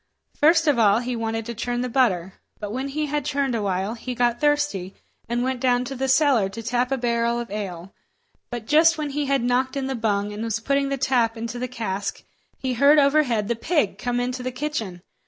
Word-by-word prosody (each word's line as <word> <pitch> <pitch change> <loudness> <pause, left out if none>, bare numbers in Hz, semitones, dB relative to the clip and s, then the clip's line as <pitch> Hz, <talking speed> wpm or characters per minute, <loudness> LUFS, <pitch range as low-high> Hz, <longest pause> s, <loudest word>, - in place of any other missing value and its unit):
First 325 +2 +4
of 285 -5 +3
all 205 -2 +5
he 245 +1 -2
wanted 225 -1 -3
to 235 - -5
churn 240 +2 -2
the 250 - -1
butter; 195 -8 +1 0.3
but 205 -1 -5
when 260 +3 -2
he 300 +2 -2
had 295 -1 -2
churned 280 -2 -1
a 230 - -1
while, 195 +1 -1
he 245 +2 -6
got 240 0 +1
thirsty, 290 -11 0 0.3
and 240 +1 0
went 260 0 -1
down 250 -1 +2
to 275 - -5
the 265 +1 -1
cellar 265 -7 +3
to 225 +4 -8
tap 245 +2 0
a 270 - +1
barrel 235 -1 0
of 235 -3 -6
ale. 190 -3 -6 0.6
So, 240 - -3
just 315 +8 +4
when 300 -2 -3
he 290 0 -2
had 275 -3 +1
knocked 255 +3 0
in 270 - -2
the 270 - -2
bung, 210 -3 -1
and 210 - -6
was 225 -1 -1
putting 275 +3 0
the 275 - -1
tap 245 -3 +1
into 230 +2 -5
the 250 - -2
cask, 205 -5 -4 0.3
he 260 -1 -2
heard 280 +5 +5
overhead 280 -7 +3
the 235 - 0
pig 305 +6 0
come 245 0 -1
into 250 +1 -2
the 255 0 -3
kitchen. 245 -10 -4
245 Hz, 225 wpm, -23 LUFS, 225-275 Hz, 0.6 s, all